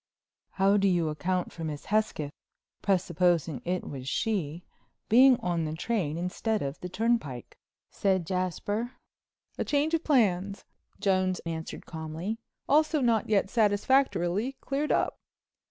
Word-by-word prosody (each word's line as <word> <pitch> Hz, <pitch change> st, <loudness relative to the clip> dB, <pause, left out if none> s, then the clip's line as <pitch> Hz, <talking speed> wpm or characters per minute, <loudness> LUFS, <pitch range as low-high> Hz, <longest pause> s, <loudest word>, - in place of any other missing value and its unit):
"How 195 Hz, +1 st, +3 dB
do 200 Hz, 0 st, +3 dB
you 175 Hz, -4 st, +2 dB
account 180 Hz, +4 st, -1 dB
for 165 Hz, -, -8 dB
Miss 150 Hz, -2 st, -5 dB
Hesketh—presupposing 175 Hz, -, -1 dB
it 180 Hz, +1 st, -2 dB
was 135 Hz, -2 st, -5 dB
she—being 220 Hz, -, +2 dB
on 175 Hz, -2 st, 0 dB
the 155 Hz, 0 st, -3 dB
train 170 Hz, -4 st, -1 dB
instead 205 Hz, +5 st, -1 dB
of 140 Hz, +2 st, -4 dB
the 180 Hz, -, -6 dB
turnpike?" 185 Hz, -, -1 dB, 0.4 s
said 190 Hz, -3 st, +1 dB
Jasper. 195 Hz, +6 st, -2 dB, 0.7 s
"A -, -, +2 dB
change 295 Hz, +2 st, +1 dB
of 330 Hz, 0 st, +1 dB
plans," 200 Hz, -, +1 dB, 0.3 s
Jones 185 Hz, -2 st, +1 dB
answered 160 Hz, -1 st, -5 dB
calmly, 160 Hz, +7 st, -5 dB, 0.3 s
"also 310 Hz, +1 st, +3 dB
not 230 Hz, -5 st, +2 dB
yet 200 Hz, -3 st, +3 dB
satisfactorily 210 Hz, -1 st, +2 dB
cleared 280 Hz, +2 st, -2 dB
up. -, -, +1 dB
185 Hz, 120 wpm, -28 LUFS, 170-225 Hz, 0.7 s, How